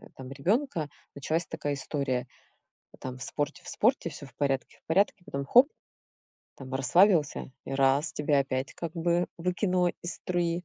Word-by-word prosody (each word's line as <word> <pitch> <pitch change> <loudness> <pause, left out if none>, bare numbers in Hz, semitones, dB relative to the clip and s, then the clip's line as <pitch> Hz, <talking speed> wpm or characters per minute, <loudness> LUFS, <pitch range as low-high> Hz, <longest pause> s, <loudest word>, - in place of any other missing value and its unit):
там 130 0 -9
ребёнка 175 - 0 0.3
началась 155 +4 -1
такая 150 -2 -3
история: 135 -3 -2 0.7
там 130 0 -6
в - - -7
спорте 145 +2 -3
в - - -10
спорте, 220 -6 +2
всё 145 0 -9
в - - -18
порядке 135 -2 -1
в - - -73
порядке, 185 +1 +2
потом 140 0 -4
хоп. 250 - +7 0.9
Там 130 -1 -9
расслабился, 150 - +3
и - - -5
раз 135 +3 +3
тебя 150 -1 +2
опять 135 -1 -1
как 170 -2 -5
бы 170 +1 +1
выкинуло 180 +1 +1
из 175 - -2
струи. 175 -1 -1
155 Hz, 160 wpm, -29 LUFS, 135-175 Hz, 0.9 s, хоп